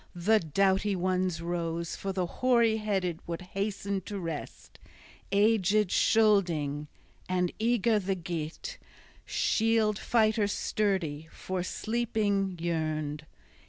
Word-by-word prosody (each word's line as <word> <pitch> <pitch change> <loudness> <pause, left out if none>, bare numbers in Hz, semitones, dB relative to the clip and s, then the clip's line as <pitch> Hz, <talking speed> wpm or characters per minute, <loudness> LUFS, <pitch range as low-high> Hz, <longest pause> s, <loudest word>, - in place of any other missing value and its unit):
The 210 +6 +3
doughty 195 +4 +1
ones 185 -2 0
rose: 170 -1 -2
for 195 - -4
the 185 -1 -1
hoary 235 +2 +2
headed 190 -6 -1
would 170 +1 -4
hasten 200 -1 -2
to 205 - -4
rest, 165 -5 -7 0.5
aged 210 -1 +3
Scylding; 170 -10 +2 0.4
and 180 -1 +1
eager 230 -1 +2
the 195 0 -1
Geat, 170 - -5 0.5
shield 220 -2 +2
fighter 220 -2 +2
sturdy, 185 -8 -1
for 185 -1 -4
sleeping 205 -2 -1
yearned. 155 -3 -2
190 Hz, 105 wpm, -29 LUFS, 170-215 Hz, 0.5 s, The